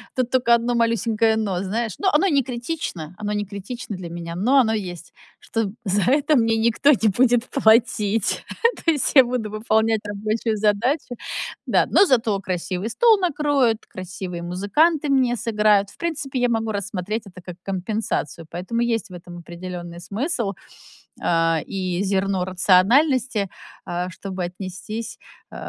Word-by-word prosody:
Тут 255 -2 0
только 245 -2 +4
одно 235 +1 -1
малюсенькое 230 -1 +2
но, 200 -5 -1
знаешь, 220 +2 -2
но 390 - +2
оно 305 +6 +4
и - - +1
не 280 -2 +4
критично, 240 - -5
оно 210 -1 -3
не 205 0 -1
критично 205 +2 -7
для 180 -2 -7
меня, 170 0 -6
но 245 +10 +3
оно 230 -4 +3
есть, 180 -6 -5 0.3
что 225 -3 -2
за 200 -1 +1
это 295 +2 +3
мне 225 -1 +2
никто 235 +6 +3
не 225 -5 +3
будет 240 +3 +3
платить. 220 -4 +2 0.4
То 330 - +5
есть 295 -4 0
я 265 -2 +9
буду 240 -3 -2
выполнять 220 +1 +1
рабочую 215 +2 -2
задачу. 235 +6 0 0.5
Да, - - +3
но 395 - +6
зато 230 - +2
красивый 185 +2 -3
стол 445 - +4
накроют, 290 - +1
красивые 180 -1 -7
музыканты 275 - +1
мне 260 -3 +3
сыграют. 210 -3 +2
В - - -18
принципе, 300 -6 -3
я 245 - +3
могу 225 -2 -1
рассмотреть 200 +1 -3
это 180 -1 -12
как 175 -1 -9
компенсацию, 190 -4 -3
поэтому 185 +7 -4
есть 230 -3 0
в - - -12
этом 175 0 -10
определенный 175 0 -8
смысл, 210 - -2 0.7
э, 165 -2 +2
и 185 -2 -2
зерно 195 -1 0
рациональности, 210 - +3 0.4
э, 175 +1 -2
чтобы 185 -1 -5
отнестись, 190 +5 -6 0.3
э, - - -11
215 Hz, 155 wpm, -22 LUFS, 185-245 Hz, 0.7 s, я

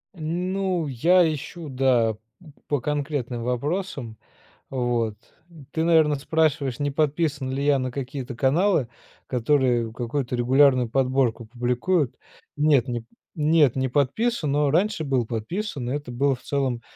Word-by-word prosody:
Ну, 180 +2 -1
я 165 +6 +4
ищу, 155 +2 -7
да, 125 -4 +2 0.5
по 145 - 0
конкретным 140 -4 -2
вопросам, 125 - -3 0.5
вот. 120 -4 -1 0.6
Ты 160 - -1
наверное 160 -3 +4
спрашиваешь 145 -3 0
не 145 0 0
подписан 145 -2 0
ли 135 +1 -2
я 145 -1 +4
на 130 -1 -3
какие-то 130 -1 -5
каналы, 150 - +2 0.4
которые 125 -2 +1
какую-то 125 +2 -3
регулярную 130 0 +4
подборку 130 -2 +1
публикуют. 125 +6 0 0.4
Нет, 145 -4 +3
не 120 -2 -3
п - - -24 0.3
нет 150 -4 +3
не 130 0 0
подписан, 150 - 0
но 145 0 +2
раньше 185 +2 +1
был 130 -4 +1
подписан 125 - -4
и - - 0
это 145 -4 -6
было 135 +3 +1
в 125 - -17
целом 135 -4 -1
140 Hz, 135 wpm, -24 LUFS, 125-155 Hz, 0.6 s, я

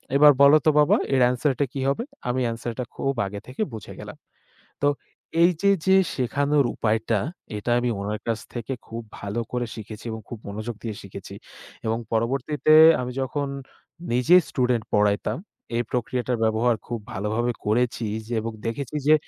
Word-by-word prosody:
"এবার 150 +1 +8
বলো 140 +2 +8
তো - - +6
বাবা 150 - +5 0.2
এর 130 - +3
answer 125 +3 +1 0.2
কি 140 - -4
হবে?" 140 +12 -1 0.3
আমি 130 +1 0
answer 115 +1 -4
টা - - 0
খুব 135 - -1
আগে 100 +1 -5
থেকে 130 +10 -6
বুঝে 110 -4 -8
গেলাম। - - -9 0.6
তো 145 - +3 0.6
এইযে 175 +3 +3 0.2
যে 190 - +5 0.2
শেখানোর 140 +3 +1
উপায়টা, 110 0 +1 0.4
এটা 105 +4 -2
আমি 120 0 0
ওনার 105 +1 -3
কাছ 115 -1 0
থেকে 120 +2 -4
খুব 115 +1 -5 0.2
ভালো 100 +3 -3
করে 125 -1 -1
শিখেছি 110 0 -9
এবং 110 - -6
খুব 120 - -7
মনোযোগ 110 +3 -5
দিয়ে 110 -3 -4
শিখেছি। 100 0 -9 0.5
এবং 110 +1 +1
পরবর্তীতে 135 +7 +1 0.3
আমি 125 0 -4
যখন 140 +2 -2 0.6
নিজে 125 +9 +5
স্টুডেন্ট 125 -3 +1
পড়াইতাম, 105 -1 +2 0.4
এই 120 - +1
প্রক্রিয়াটার 125 0 -1
ব্যবহার 110 +2 +2
খুব 120 -2 -3
ভালোভাবে 110 +5 -1
করেছি 120 +2 +1 0.2
যে 120 - -4
এবং 115 +1 -3
দেখেছি 130 +5 -3
যে 155 - +7
120 Hz, 160 wpm, -24 LUFS, 110-135 Hz, 0.6 s, এবার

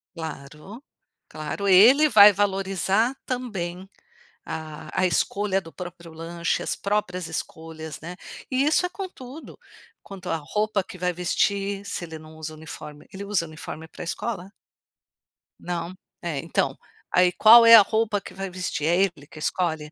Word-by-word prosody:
Claro, 160 - -9 0.4
claro. 155 +6 -5
Ele 240 +11 +7
vai 210 -4 +9
valorizar 195 +3 0
também 190 -8 -4 0.6
a 155 -1 -6 0.2
a - - +4
escolha 195 +4 0
do 165 - -13
próprio 175 -2 -9
lanche, 170 +1 -2
as - - -1
próprias 185 -4 -2
escolhas, 160 -1 -6
né. 170 +3 -7 0.3
E 260 0 +1
isso 305 +5 +3
é - - -2
com 385 +1 -6
tudo. 265 +1 -11 0.5
Quanto 195 -2 -10
à 165 - +1
roupa 210 +6 -1
que 185 - -11
vai 180 0 0
vestir, 200 +3 0
se 180 - -4
ele 160 -1 -8
não 155 0 -14
usa 155 0 -6
uniforme 150 -1 -10
Ele 195 +1 -7
usa 200 -4 0
uniforme 155 +1 -8
pra - - -9
escola? 190 +2 -4 1.1
Não? 175 0 -4 0.3
É, 165 -5 -3
então, - - -1 0.3
aí 180 0 +4
qual 230 +2 +8
é 230 0 +11
a 220 - +11
roupa 215 -1 0
que - - -11
vai 195 0 -5
vestir? 180 -4 -3
É 175 +1 +3
ele 175 -7 0
que 155 - -12
escolhe? 160 -2 -2
185 Hz, 155 wpm, -24 LUFS, 160-205 Hz, 1.1 s, é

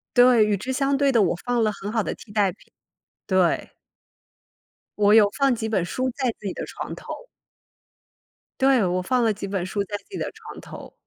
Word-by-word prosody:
对， 245 -3 +6
与 210 -1 +1
之 260 +7 -4
相 275 +1 +1
对 280 -1 +3
的， 230 -4 +4
我 175 -2 +2
放 245 -1 +1
了 215 - +2
很 200 +1 -6
好 220 -2 0
的 - - -3
替 205 - -14
代 200 -3 +2
品。 205 - -21 0.6
对。 185 -3 +1 1.3
我 205 0 +5
有 215 -2 +7
放 275 -3 +3
几 220 -1 -3
本 190 -6 +1
书 255 +9 -2
在 260 -3 0
自 210 - -14
己 190 - -3
的 - - -5
床 - - -7
头。 - - -8 1.5
对， 265 -6 +4
我 180 0 0
放 245 +6 +1
了 220 -2 +2
几 200 0 -6
本 190 -2 -2
书 200 +2 -2
在 205 +1 -4
自 - - -21
己 395 - -6
的 - - -3
床 - - -11
头， - - -11
215 Hz, 220 characters per minute, -24 LUFS, 200-250 Hz, 1.5 s, 有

